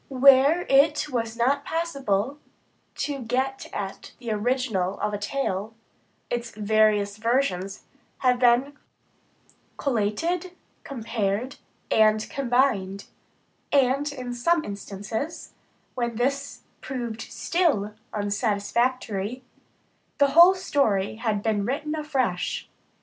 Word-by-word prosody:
Where 275 +5 +6
it 295 +2 +4
was 230 -2 -2
not 275 +4 +2
possible 275 -7 -1 0.6
to 285 -2 -3
get 260 +3 -2
at 195 -1 -6
the 235 -3 -5
original 215 -4 0
of 210 - -1
a 205 - -2
tale, 210 -2 -2 0.6
its 240 -1 -2
various 210 -1 +2
versions 215 -5 0 0.3
have 250 -1 +2
been 250 +3 +3 1.0
collated, 285 - -1 0.3
compared, 230 -1 -2 0.3
and 215 0 +4
combined; 240 -7 +1 0.7
and 275 +1 +2
in 250 -3 -5
some 320 +7 +2
instances, 205 - -5 0.4
when 235 -2 -2
this 275 +4 -2 0.2
proved 240 -4 -4
still 280 - 0 0.2
unsatisfactory, 210 +2 -1 0.7
the 280 -1 +4
whole 345 +6 +8
story 220 - 0
has 215 -3 -1
been 215 -3 +1
written 285 +7 -2
afresh. 270 - -1
245 Hz, 100 wpm, -25 LUFS, 210-275 Hz, 1.0 s, whole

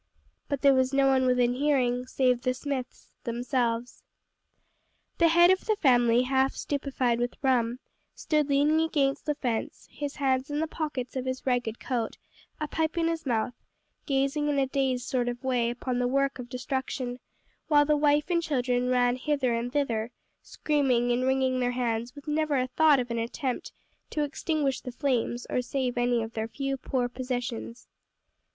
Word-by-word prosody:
But 280 -2 -2
there 280 -1 +7
was 260 +1 +2
no 275 0 +4
one 265 -1 +3
within 250 -1 +3
hearing, 255 -3 +1
save 250 -2 +1
the 255 0 0
Smiths 260 -1 -5
themselves. 240 0 -2 1.2
The 335 - +6
head 345 +2 +6
of 375 - +1
the 435 - +3
family, 245 - +4
half 265 +1 +2
stupefied 265 -4 -1
with 245 0 -1
rum, 245 -3 +2 0.4
stood 300 -2 0
leaning 295 +3 +3
against 290 -4 0
the 300 - +1
fence, 240 -6 -3
his 290 -1 -5
hands 265 -1 0
in 290 0 -2
the 320 - +1
pockets 300 -6 -4
of 260 -1 -2
his 260 0 -4
ragged 245 -3 0
coat, 235 -4 -3 0.4
a 305 - -2
pipe 320 +2 -1
in 330 -1 +2
his 325 -3 -3
mouth, 235 0 0 0.5
gazing 275 +1 +1
in 290 - 0
a 275 - +3
dazed 260 -2 -1
sort 245 -2 0
of 245 +1 -6
way 250 -3 +1
upon 245 +1 -3
the 245 - +1
work 275 +1 0
of 245 -1 -7
destruction; 255 -1 -3 0.5
while 290 -2 +5
the 300 +1 +3
wife 295 +2 +2
and 340 -1 +2
children 250 -5 0
ran 245 0 +2
hither 265 -2 0
and 235 +1 -2
thither, 235 -6 -1 0.3
screaming 260 -5 +1
and 245 +1 +1
wringing 260 -1 +1
their 245 0 0
hands 240 0 -2
with 285 +1 -12
never 300 -1 +1
a 255 - +1
thought 295 +2 +4
of 245 -1 -3
an 235 - -1
attempt 250 +2 -3 0.4
to 300 - -1
extinguish 290 -1 -1
the 250 - -6
flames 245 -2 -1
or 250 - +1
save 250 0 -2
any 240 -1 +1
of 225 +1 -7
their 220 0 -2
few 275 +3 -3
poor 255 -1 -1
possessions. 245 -1 -5
260 Hz, 175 wpm, -28 LUFS, 245-285 Hz, 1.2 s, there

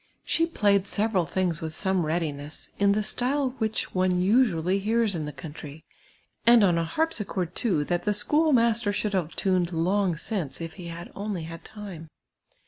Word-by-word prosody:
She 330 0 +1
i)layed 200 - +2
several 205 -6 0
things 175 -1 0
with 160 -1 -4
some 190 -4 +1
readiness, 155 -3 -3
in 200 0 +4
the 215 +1 0
style 255 +5 0
which 220 -1 -1
(me 185 0 +2
usually 185 -1 +2
henrs 220 0 +1
in 155 -2 -3
the 150 - -5
country, 150 -1 -10 0.6
and 235 -2 +6
on 175 -4 +3
a - - +1
har})sich(»rd, 200 - -1
too, 180 -11 0
that 175 +3 -1
the 210 - 0
schoolmaster 235 -4 +3
should 205 +1 -2
have 175 -4 -1
tuned 185 -3 +1
long 180 +2 +1
since, 170 - -3
if 165 -1 -6
he 175 -1 -9
had 170 +1 -8
only 200 -4 -4
had 165 +1 -8
time. 190 -7 -9
190 Hz, 170 wpm, -26 LUFS, 165-215 Hz, 0.6 s, and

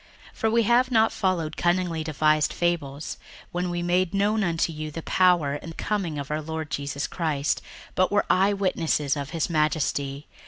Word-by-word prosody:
61:001:016 - - -24
For 225 - +2
we 230 +1 +3
have 240 +4 +3
not 225 -3 +4
followed 170 -5 -1
cunningly 175 -2 +1
devised 155 0 +2
fables, 155 -4 -2 0.3
when 180 +1 -2
we 175 0 -2
made 180 +1 +1
known 210 +2 +2
unto 165 -2 0
you 155 0 -5
the 160 +2 -7
power 175 -6 +3
and 165 0 -9
coming 190 -8 -2
of 140 0 -5
our 155 +1 -1
Lord 160 -1 -5
Jesus 140 0 -2
Christ, 150 -5 -1 0.3
but 185 - +2
were 205 - +2
eyewitnesses 185 -7 +1
of 140 -1 -4
his 165 -1 -1
majesty. 150 -3 0
165 Hz, 170 wpm, -25 LUFS, 150-185 Hz, 0.3 s, not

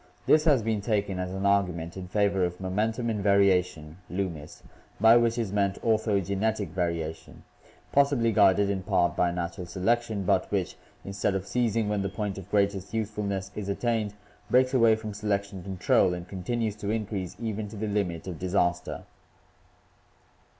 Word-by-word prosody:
This 155 +1 +4
has 140 -8 +4
been 110 -2 -1
taken 100 -3 -1
as 90 0 -3
an 95 +1 -3
argument 90 -4 +1
in 95 -1 -7
favor 100 0 +1
of 90 0 -2
momentum 110 +6 -1
in 110 -3 -1
variation 90 -5 +2
(Loomis), 90 -5 -5 0.4
by 110 +3 +7
which 120 0 +3
is 110 -5 -2
meant 100 -1 0
ortho 110 -4 +1
genetic 100 0 -1
variation, 85 -2 -4 0.5
possibly 140 -5 +3
guided 100 -1 +4
in 95 -1 -2
part 90 -2 +1
by 90 - +2
natural 85 +1 -4
selection, 105 +3 0
but 95 0 +1
which, 95 -3 -1 0.3
instead 100 0 -1
of 95 -1 -2
ceasing 115 -2 0
when 105 -1 0
the 100 - -2
point 100 0 -4
of 95 0 -12
greatest 100 0 0
usefulness 100 -3 -3
is 100 -2 -4
attained, 110 -1 -1 0.3
breaks 130 +1 +3
away 115 -4 +5
from 110 -1 -6
selection 100 -2 -2
control 90 -1 +2
and 90 0 -8
continues 105 +3 -2
to 105 -1 -4
increase 105 -4 -3
even 110 -2 -3
to 105 - -10
the 110 +1 -3
limit 100 -6 -2
of 90 -4 -6
disaster. 90 -1 -1
100 Hz, 165 wpm, -27 LUFS, 90-110 Hz, 0.5 s, by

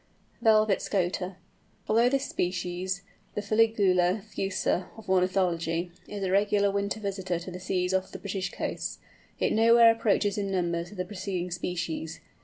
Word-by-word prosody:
VELVET 215 -3 +4
SCOTER. 185 -1 -1 0.5
Although 230 +3 +4
this 275 +1 0
species, 180 +1 -2 0.3
the 210 - -1
Fuligula 200 -3 +3
fusca 195 -3 -1
of 220 - -12
ornithology, 180 -2 +1 0.2
is 205 -1 -5
a 185 - 0
regular 200 0 +3
winter 200 +2 -1
visitor 190 -3 -2
to 175 +2 -7
the 180 - -7
seas 180 0 -1
off 190 0 0
the - - -6
British 190 -2 -3
coasts, - - -4 0.4
it - - +1
nowhere 230 +1 +7
approaches 205 -2 +1
in 200 -1 -2
numbers 175 -2 -1
the 180 -2 -4
preceding 185 -2 -4
species. 165 -2 -3
190 Hz, 145 wpm, -28 LUFS, 180-205 Hz, 0.5 s, nowhere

